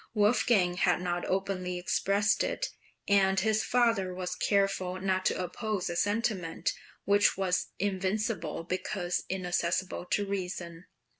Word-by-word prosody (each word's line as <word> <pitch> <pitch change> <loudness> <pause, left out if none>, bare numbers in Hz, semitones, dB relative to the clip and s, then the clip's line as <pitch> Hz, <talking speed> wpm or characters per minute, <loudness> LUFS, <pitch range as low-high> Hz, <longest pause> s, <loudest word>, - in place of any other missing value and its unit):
Wolfgang 205 -4 +3
had 180 -1 +3
not 175 -1 -2
openly 185 -1 -1
expressed 200 +3 +1
it, - - -2 0.4
and 195 -1 +4
his 215 +2 +2
father 230 -7 +2
was 180 0 -3
careful 195 -2 +1
not 185 0 0
to - - 0
oppose 195 +1 -2
a - - -4
sentiment 205 -3 0 0.3
which 200 -1 +4
was 185 -2 0
invincible 195 -3 -1
because 180 0 -2
inaccessible 180 -1 -1
to 205 +3 0
reason. 180 -3 -5
190 Hz, 125 wpm, -30 LUFS, 180-205 Hz, 0.4 s, and